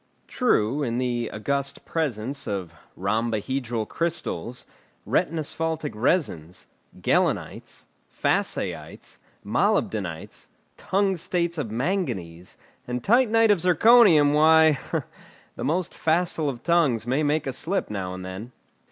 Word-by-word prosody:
True, 145 - +1
in 120 -4 -1
the 120 -2 -1
august 140 +5 -3
presence 140 -3 -3
of 95 -4 -4 0.2
rhombohedral 115 +3 -1
crystals, 160 - -3 0.4
retinasphaltic 160 -1 -1
resins, 95 - -1 0.3
gehlenites, - - -1 0.3
Fassaites, - - -2 0.3
molybdenites, 90 -7 -1 0.3
tungstates 180 -3 0
of 130 -7 -3
manganese, 110 - -3 0.3
and 125 0 -3
titanite 225 -1 +4
of 200 - +3
zirconium, 180 -4 +6
why, 155 -1 +5 0.8
the - - -6
most 170 +3 -1
facile 165 -2 0
of 125 -4 -7
tongues 160 -10 +2
may 130 +5 0
make 150 0 +1
a 135 - -3
slip 190 - -2
now 95 -3 -4
and 95 0 -8
then. 100 +7 -8
140 Hz, 105 wpm, -25 LUFS, 110-165 Hz, 0.8 s, zirconium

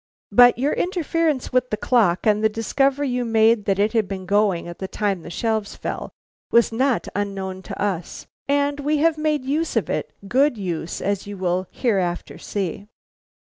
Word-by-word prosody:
"But 245 0 +7
your 275 +4 +1
interference 330 -7 -1
with 250 0 +2
the 215 - -1
clock 215 -7 +2
and 215 0 +3
the 220 - +4
discovery 270 +6 0
you 250 0 -1
made 225 -2 +3
that 195 -1 +1
it 210 +3 +1
had 220 -4 +2
been 190 -1 -5
going 200 -3 +1
at 175 - -9
the 190 - -4
time 200 -3 -1
the - - -9
shelves 220 +3 -2
fell, - - -5 0.4
was 235 0 +4
not 255 +2 +1
unknown 195 -2 -3
to - - -8
us, 190 -4 -3 0.2
and 285 0 +1
we 295 +2 +1
have 315 +1 +2
made 305 -3 0
use 305 +3 -1
of 210 -9 0
it, 155 - -2 0.2
good 265 +2 +3
use 175 -4 -4
as 200 0 -1
you 205 -1 -6
will 185 0 -1
hereafter 190 -8 -1
see." 200 0 -4
220 Hz, 180 wpm, -22 LUFS, 195-270 Hz, 0.4 s, But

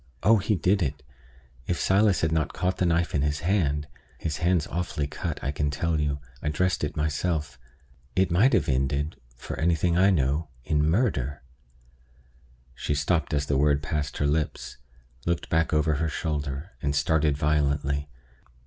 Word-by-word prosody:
Oh, 115 +3 +6
he 105 +2 +1
did 95 +3 +2
it! 70 -6 -2 0.6
If 85 - -1
Silas 100 0 +3
had 80 - +1
not 80 -2 0
caught 90 +1 -1
the 90 - +2
knife 85 +1 +1
in 75 - +2
his 75 +1 0
hand 75 -6 +1 0.3
(his 75 -3 -3
hand's 85 -1 +2
awfully 85 -4 -2
cut, 80 +2 -4
I 70 - 0
can 75 0 -1
tell 80 +3 0
you; 75 -1 0 0.2
I - - -1
dressed 90 +4 0
it 75 - -3
myself), 75 -3 -1 0.6
it 95 -1 +2
might 110 +11 +4
have - - +3
ended, 70 +3 0 0.2
for - - -7
anything 85 +1 +2
I 95 +1 +6
know, 75 -2 +1 0.2
in 75 +2 +1
murder 75 - 0 0.7
" 65 0 -31
She 75 - 0
stopped 75 +2 0
as 75 -1 0
the 70 - +1
word 75 0 +3
passed 75 -1 -2
her 75 - 0
lips, 75 +1 -1 0.5
looked 85 -1 -1
back 80 0 +2
over 75 0 +2
her 80 +2 0
shoulder, 75 +1 -3
and 70 -2 -1
started 75 -1 +2
violently. 70 -1 0
75 Hz, 170 wpm, -26 LUFS, 70-85 Hz, 0.7 s, Oh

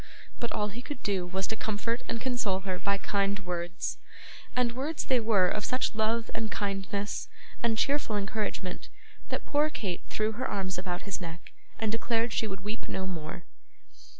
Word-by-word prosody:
But 235 - -1
all 210 0 +1
he 230 +5 -6
could 285 0 -6
do 190 -3 +1
was 190 +1 0
to 220 - -1
comfort 220 +2 0
and 230 - 0
console 225 -7 +1
her 185 -1 -1
by 200 0 +2
kind 200 0 +2
words; 175 -2 -2 0.6
and 250 -1 +4
words 280 +6 -1
they 255 -2 +4
were 215 -5 +5
of 210 +3 0
such 255 -1 +1
love 220 +1 +2
and 220 -1 -1
kindness, 200 0 -1 0.3
and 230 -1 +3
cheerful 275 -5 +2
encouragement, 200 -2 -2 0.4
that - - -1
poor 295 +1 +4
Kate 190 - -2
threw 215 0 +2
her 250 +4 -1
arms 190 -3 0
about 180 -1 -2
his 200 0 -2
neck, 165 -1 -6 0.3
and 220 -1 +1
declared 230 +1 +2
she 220 - +2
would 195 -2 -4
weep 210 +4 -3
no 190 - -1
more. 170 -1 -4
210 Hz, 180 wpm, -31 LUFS, 190-230 Hz, 0.6 s, were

